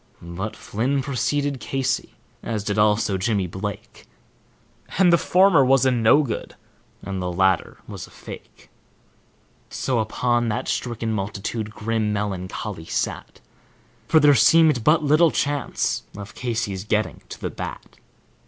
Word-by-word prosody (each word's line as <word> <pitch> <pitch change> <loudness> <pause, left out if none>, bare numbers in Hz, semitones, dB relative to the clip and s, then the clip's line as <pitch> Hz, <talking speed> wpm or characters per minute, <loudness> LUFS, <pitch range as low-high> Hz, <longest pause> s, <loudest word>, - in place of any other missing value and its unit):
But 85 +5 -6
Flynn 130 +6 -1
procede 140 +1 -1
Casey, 135 0 -2 0.3
as 110 -3 -3
did 105 0 -1
also 105 -2 +2
Jimmy 100 -1 0
Blake, 95 +3 -7 0.9
And 180 -2 +5
the - - +7
former 185 -5 +5
was 135 0 +4
a 130 - +4
no 120 +5 +4
good 120 -6 -5 0.5
and 95 -1 -4
the 90 0 -2
latter 95 0 +1
was - - -8
a - - -18
fake; - - -12 1.0
So, 130 -3 -1
upon 120 +2 0
that 105 - -2
stricken 115 -2 -2
multitude 105 +2 -3
grim 110 0 -2
meloncholy 95 -3 -4
sat, - - -3 0.7
For 160 - +5
there 145 -1 +6
seemed 155 -3 +5
but 155 +5 +4
little 155 +3 +5
chance 145 -3 -1 0.2
of 100 -1 -8
Casey's 115 -6 -3
getting 105 0 -1
to - - -8
the - - -4
bat. - - -8
115 Hz, 135 wpm, -23 LUFS, 100-135 Hz, 1.0 s, the